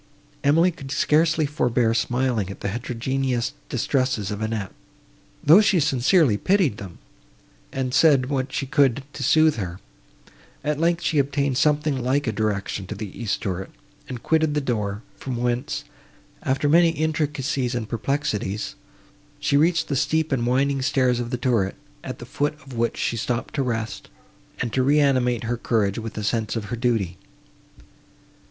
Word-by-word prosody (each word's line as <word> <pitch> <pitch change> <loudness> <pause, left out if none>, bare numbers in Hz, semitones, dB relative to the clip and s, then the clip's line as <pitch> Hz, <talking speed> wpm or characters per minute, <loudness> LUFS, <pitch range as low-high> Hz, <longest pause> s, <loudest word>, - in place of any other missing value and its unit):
Emily 165 +6 +4
could 135 -5 -10
scarcely 155 +2 +2
forbear 125 -5 +1
smiling 120 -4 0
at 100 - -9
the 100 - -1
heterogeneous 125 +2 -2 0.2
distresses 130 -7 0
of 105 +1 -4
Annette, 110 -3 -2 0.7
though 165 +8 +8
she 195 -4 +3
sincerely 140 - +3
pitied 180 - +2
them, 95 -4 -9 0.7
and 130 -1 -2
said 140 -5 +5
what 130 -1 -2
she 135 - -2
could 135 -1 +2
to - - -7
sooth 155 +2 +4
her. 90 -3 -4 0.8
At 150 0 -1
length, 170 +1 +1
she 155 - +2
obtained 140 -1 0
something 150 -1 +2
like 135 +3 +1
a 115 - 0
direction 105 -2 -2
to 105 - -5
the 105 -1 -7
east 115 -4 -2
turret, 95 -1 -3 0.4
and 125 -3 -6
quitted 160 -2 +2
the - - +3
door, 105 -6 -2
from 130 -2 -5
whence, 120 +1 -1 0.6
after 135 +2 0
many 170 +3 +5
intricacies 150 -5 -1
and 115 -3 -3
perplexities, 115 -5 -2 0.7
she 145 -1 +1
reached 165 +3 +3
the 140 - -1
steep 155 +3 +1
and 120 -3 0
winding 135 +2 +1
stairs 130 -2 +2
of 120 -1 -3
the 125 - -2
turret, 120 -7 0 0.3
at 130 - -6
the 120 - -9
foot 145 +4 -1
of 135 - -11
which 115 0 -1
she 115 - -1
stopped 120 +1 -2
to 140 - 0
rest, 115 -3 -3 0.5
and 120 - -2
to 130 - +2
reanimate 130 -4 +3
her 120 +1 -1
courage 110 -3 0
with 115 -1 -7
a 105 - -3
sense 110 +1 -1
of 110 -2 -3
her - - +1
duty. 115 -7 -1
130 Hz, 160 wpm, -23 LUFS, 115-145 Hz, 0.8 s, though